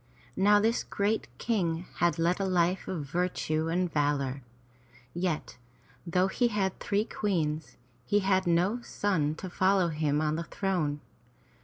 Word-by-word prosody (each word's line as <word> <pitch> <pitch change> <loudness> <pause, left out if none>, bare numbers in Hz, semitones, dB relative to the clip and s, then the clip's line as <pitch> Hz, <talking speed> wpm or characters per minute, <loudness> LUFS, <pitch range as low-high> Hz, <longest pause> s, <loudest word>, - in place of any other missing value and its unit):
Now 205 +2 +5
this 225 +3 +1
great 205 +2 -1
King 175 - -1
had 175 0 +2
led 170 +3 +1
a 195 - 0
life 180 0 +1
of 165 -6 -3
virtue 160 -1 -1
and 175 +3 +1
of - - -15
valor; 140 -2 0 0.7
yet, 175 -3 -2 0.5
though 180 +2 +2
he 240 +5 +1
had 200 -4 -1
three 205 +1 0
Queens, 160 -9 -2 0.3
he 205 +10 +2
had 190 -1 +2
no 180 +8 +2
son 165 -10 0
to 185 - -7
follow 185 0 +2
him 150 -2 0
on 155 0 0
the 170 - -2
throne. 165 -6 -1
175 Hz, 150 wpm, -29 LUFS, 155-195 Hz, 0.7 s, Now